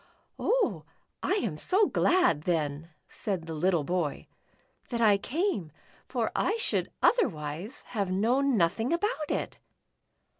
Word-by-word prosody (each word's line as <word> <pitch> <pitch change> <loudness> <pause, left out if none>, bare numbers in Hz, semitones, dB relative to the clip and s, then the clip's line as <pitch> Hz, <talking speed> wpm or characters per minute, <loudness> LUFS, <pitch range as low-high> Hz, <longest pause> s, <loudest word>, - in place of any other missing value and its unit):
"Oh, - - +1 0.4
I - - +1
am 210 - -1
so 395 - +3
glad 350 - +3
then," 155 -2 -1 0.2
said 190 -7 -4
the 165 - -5
little 170 0 +1
boy, 170 -2 -2 0.6
"that 235 - -2
I 210 -3 +5
came, 255 - -1 0.4
for - - -1
I 455 - +1
should 455 - 0
otherwise 175 - 0
have 200 -5 -1
known 240 +7 +2
nothing 215 - +1
about 340 -3 -1
it." - - -3
205 Hz, 125 wpm, -29 LUFS, -, 0.6 s, I